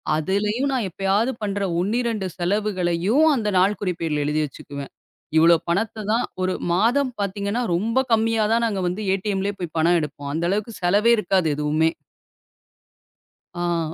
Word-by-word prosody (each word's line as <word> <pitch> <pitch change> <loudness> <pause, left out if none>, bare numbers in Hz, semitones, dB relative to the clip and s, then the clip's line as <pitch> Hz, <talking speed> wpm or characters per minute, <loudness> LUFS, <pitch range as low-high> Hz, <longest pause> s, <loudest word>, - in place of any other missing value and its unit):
அதுலயும் 210 - 0
நான் 245 -6 0
எப்பயாவது 195 +6 0
பண்ற 200 -1 -2 0.2
1 200 +6 0
2 225 -5 -2
செலவுகளையும் 190 - +1
அந்த 215 -4 -1
நாள்குறிப்பேடுல 180 -6 0
எழுதி 150 +1 0
வச்சுக்குவேன். 140 0 -9 0.5
இவ்வளவு 165 0 +6
பணத்தை 215 +5 -1
தான் 235 +2 +2 0.2
ஒரு 185 0 0 0.2
மாதம் 245 +7 +2
பாத்தீங்கன்னா 200 +4 -2
ரொம்ப 230 +8 +1
கம்மியா 225 0 +2
தான் 235 +1 +2
நாங்க 205 -4 -1
வந்து 180 +4 -3
ஏடிஎம்ல 195 0 -1
போய் 170 -3 -6
பணம் 170 +2 +4
எடுப்போம். 145 -1 -6
அந்த 165 +2 -1
அளவுக்குச் 210 +2 -3
செலவே 205 +6 +4
இருக்காது 190 -4 +1
எதுவுமே. 150 +2 +1 1.7
ஆ. 170 -2 -1
195 Hz, 140 wpm, -22 LUFS, 170-215 Hz, 1.7 s, இவ்வளவு